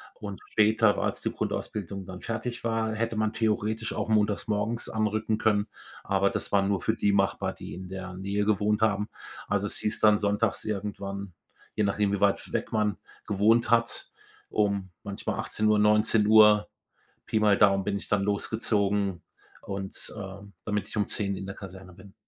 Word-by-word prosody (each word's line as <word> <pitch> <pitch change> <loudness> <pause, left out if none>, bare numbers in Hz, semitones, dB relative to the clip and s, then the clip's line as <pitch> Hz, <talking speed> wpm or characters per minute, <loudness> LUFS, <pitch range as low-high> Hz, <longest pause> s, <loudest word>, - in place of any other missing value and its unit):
und 100 -2 -7
später, 110 -1 +4
war - - 0
als - - -2
die - - -1
Grundausbildung 100 -2 -4
dann 90 -1 -9
fertig 120 +2 -4
war, 115 -1 0
hätte 115 0 -1
man 110 0 0
theoretisch 110 0 -1
auch - - -3
montagmorgens 105 +1 0
anrücken 110 0 0
können, 105 -1 +2 0.4
aber 100 0 +2
das - - -3
war 100 -1 +4
nur 95 -2 0
für 110 - 0
die 100 - +2
machbar, 100 -1 +1
die - - -9
in 90 0 -8
der 95 -1 -6
Nähe 100 +2 -2
gewohnt 105 +1 +1
haben. 105 -1 +1 0.4
Also 100 0 0
es - - 0
hieß 105 +1 -1
dann 105 -1 +5
sonntags 105 +1 +1
irgendwann, 100 -2 -4 0.4
je 105 - +1
nachdem, 100 0 +1
wie 100 - -1
weit 100 -1 +1
weg - - -2
man 105 -2 +1 0.3
gewohnt 110 +3 +3
hat, 115 0 +1 0.4
um 100 -3 0
manchmal 100 -1 -4
18:00, 105 0 +1 0.2
19:00, 105 -1 +5 0.6
Pi 110 - 0
mal 105 -2 +4
Daumen 100 -2 +4
bin 100 - -1
ich - - -9
dann 105 -1 +1
losgezogen 100 -2 0 0.4
und, 95 -1 -5
ähm, 100 0 -8
damit 105 -2 -1
ich - - -7
um 105 - +2
10:00 100 -2 -1
in 95 - -6
der 95 - -6
Kaserne 95 -2 -10
bin. 95 +2 -15
105 Hz, 170 wpm, -27 LUFS, 100-110 Hz, 0.6 s, dann